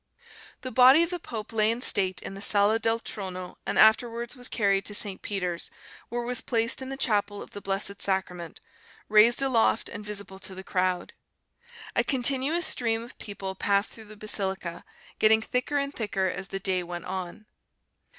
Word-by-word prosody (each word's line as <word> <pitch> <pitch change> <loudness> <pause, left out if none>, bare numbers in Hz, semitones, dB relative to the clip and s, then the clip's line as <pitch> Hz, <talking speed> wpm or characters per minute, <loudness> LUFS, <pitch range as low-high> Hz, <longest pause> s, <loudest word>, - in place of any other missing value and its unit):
The 255 - -5
body 260 +7 +7
of 340 - -3
the 355 - -3
pope 225 -7 -7
lay 215 -1 +4
in 230 +1 0
state 185 -6 0
in - - -6
the 195 - -8
Sala 205 +2 +4
del 225 0 +1
Trono 185 -5 -6
and - - -1
afterwards 235 +3 +4
was 250 -1 -4
carried 195 -3 +1
to 205 - -1
St. 200 -2 0
Peter's, 180 -4 -2 0.4
where 240 0 -2
it - - -6
was 250 0 -1
placed 230 +1 +1
in 260 - -6
the 270 - -5
chapel 205 -5 0
of - - -10
the 205 - -8
Blessed 200 +1 -2
Sacrament, 180 -3 -2 0.5
raised 225 +5 +6
aloft 235 -4 +2
and 205 - -7
visible 200 -2 -6
to 190 0 -8
the 190 - -8
crowd. 185 -1 -1 0.8
A - - +3
continuous 275 +5 +2
stream 230 -2 +1
of 240 - -12
people 200 -2 -6
passed 200 +2 +1
through 220 - -10
the 215 0 -13
basilica, 190 -4 -2 0.4
getting 220 0 +5
thicker 250 +5 -1
and 280 0 -1
thicker 205 -5 -2
as 190 +1 -3
the 195 +1 -4
day 190 -2 +1
went 175 0 -7
on. 185 +2 -6
210 Hz, 185 wpm, -27 LUFS, 190-235 Hz, 0.8 s, body